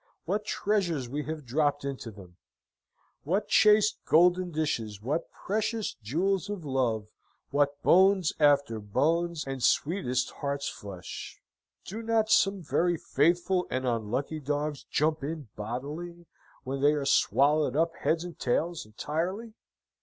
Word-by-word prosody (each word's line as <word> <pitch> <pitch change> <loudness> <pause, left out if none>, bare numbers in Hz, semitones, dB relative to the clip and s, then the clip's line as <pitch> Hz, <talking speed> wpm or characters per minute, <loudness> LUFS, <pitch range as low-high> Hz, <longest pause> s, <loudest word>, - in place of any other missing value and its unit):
What 205 +4 -1
treasures 180 - 0
we 145 +4 -4
have 155 -2 -5
dropped 145 +2 0
into 135 -4 -5
them! 95 -4 -14 0.8
What 195 +7 -1
chased 210 0 +5
golden 180 +2 +4
dishes, 120 - -2
what 145 +10 -2
precious 215 +2 -2
jewels 180 - 0
of 200 -6 -5
love, 115 -6 -1 0.4
what 145 0 +1
bones 190 -2 +5
after 140 -6 +3
bones, 160 +10 0
and 135 -1 -5
sweetest 130 -2 +1
heart's 140 0 -3
flesh! 95 -3 -8 0.5
Do 215 +5 -6
not 225 -1 +1
some 195 -3 +3
very 170 +2 +1
faithful 175 +5 +1
and 130 0 -2
unlucky 120 +6 -2
dogs 145 0 -3
jump 155 +1 0
in 150 -4 -5
bodily, 150 +11 -6 0.4
when 135 +1 -4
they 145 +1 +5
are 145 -2 -2
swallowed 140 0 +3
up 165 +2 +2
heads 165 +1 0
and 175 -1 -9
tails 160 +2 -1
entirely? 175 - -3
150 Hz, 130 wpm, -28 LUFS, 135-175 Hz, 0.8 s, chased